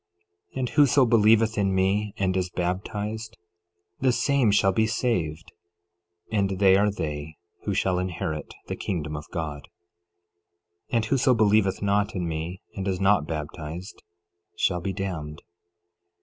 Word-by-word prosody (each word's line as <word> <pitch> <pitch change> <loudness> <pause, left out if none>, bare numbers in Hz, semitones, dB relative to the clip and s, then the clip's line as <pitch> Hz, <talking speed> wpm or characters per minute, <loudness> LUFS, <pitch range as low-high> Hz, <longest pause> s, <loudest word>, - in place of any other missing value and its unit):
11:33 - - -9
And 125 -2 -1
whoso 145 -3 +5
believeth 115 -1 +4
in 95 -1 +1
me, 100 +2 +1
and 95 -1 0
is 90 -1 0
baptized, 105 +5 -3 0.6
the 130 -1 +3
same 125 +1 +2
shall 100 -1 +4
be 110 +3 +2
saved; 90 -10 -1 0.8
and 100 -3 0
they 95 -1 +6
are 105 +2 +3
they 75 -5 -4 0.3
who 100 - -1
shall 95 -2 +1
inherit 80 -4 -4
the - - -4
kingdom 75 -6 -3
of 75 - -8
God. 75 -4 -4 1.2
11:34 - - -19
And 115 -1 +2
whoso 130 +1 +3
believeth 105 -3 +3
not 100 +1 +1
in 90 -2 -2
me, 80 +3 -4
and 95 0 -4
is 95 -2 -1
not 95 -5 +3
baptized, 80 +4 -6 0.6
shall 90 0 +1
be 95 - -2
damned. 85 -5 -5
95 Hz, 145 wpm, -26 LUFS, 85-110 Hz, 1.2 s, they